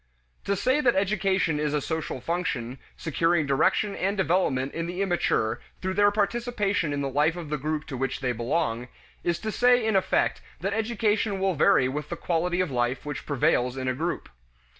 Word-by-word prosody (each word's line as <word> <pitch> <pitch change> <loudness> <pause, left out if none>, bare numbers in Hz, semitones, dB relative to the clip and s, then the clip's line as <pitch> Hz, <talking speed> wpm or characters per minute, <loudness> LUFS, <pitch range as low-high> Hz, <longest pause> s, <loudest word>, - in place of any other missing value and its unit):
To 200 - +1
say 255 +9 +2
that 245 -4 +3
education 190 -5 +1
is 150 0 0
a - - +2
social 160 -2 -3
function, 130 -6 -2 0.2
securing 165 0 +1
direction 145 +9 +2
and 195 +3 -1
development 160 -8 +1
in 165 0 -3
the 180 +3 -2
immature 165 - 0 0.2
through 190 0 -2
their 205 +1 +5
participation 205 -4 0
in 145 0 -1
the 140 - -1
life 150 +4 +2
of 170 -4 -7
the 150 - 0
group 155 +2 -2
to 135 - -6
which 135 +1 -2
they 125 -2 0
belong, 120 0 -1 0.4
is 170 -1 +1
to 220 - -4
say 245 0 +4
in 220 -2 +1
effect 190 - +1 0.2
that 195 +3 -1
education 220 -2 0
will 190 0 +1
vary 150 -4 +4
with 150 +3 -4
the 170 - -3
quality 175 +2 0
of 180 -6 -2
life 120 +2 -1
which 150 - -5
prevails 125 -2 +1
in 130 -1 -3
a 130 - +1
group. 165 +7 -3
170 Hz, 190 wpm, -26 LUFS, 140-200 Hz, 0.4 s, their